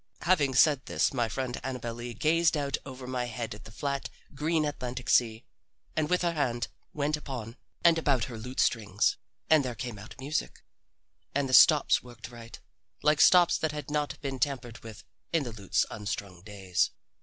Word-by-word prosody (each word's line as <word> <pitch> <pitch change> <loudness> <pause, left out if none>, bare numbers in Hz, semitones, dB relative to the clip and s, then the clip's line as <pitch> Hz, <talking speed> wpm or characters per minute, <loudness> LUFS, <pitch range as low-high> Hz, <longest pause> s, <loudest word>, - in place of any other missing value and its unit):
Having 150 -7 +2
said 145 0 +4
this, - - +1
my 120 -4 0
friend 125 +2 -4
Annabel 125 -3 -4
Lee 120 0 -7
gazed 160 +5 +2
out 140 -2 -1
over 130 -1 -8
my 125 -1 -2
head 115 -2 -5
at 105 - -12
the 110 - -11
flat, 140 +4 -3 0.2
green 155 +2 0
Atlantic 125 -3 -3
sea, 115 -2 +2 0.5
and 155 -1 0
her 180 -1 +2
hand 125 -6 -1 0.2
went 150 0 0
upon 125 -6 -7 0.3
and 170 -1 +5
about 140 -7 +2
her 115 0 -6
lute 125 +4 -7
strings, 105 -5 +2 0.3
and 155 -3 +5
there 125 -2 -4
came 120 -3 -6
out 110 - -11
music. 145 +4 -3 0.7
And 140 -1 +1
the 130 - -4
stops 150 +2 +7
worked 120 -1 -11
right, 115 -1 -11 0.4
like 150 0 +4
stops 180 -2 +6
that 155 -1 -1
had 150 -1 -6
not 150 -1 -2
been 135 -2 -4
tampered 125 -5 -2
with 110 -2 -11 0.3
in 165 -3 +2
the 120 - -5
lute's 100 -3 0
unstrung 100 -3 -5
days. 95 -3 -1
130 Hz, 180 wpm, -29 LUFS, 115-150 Hz, 0.7 s, stops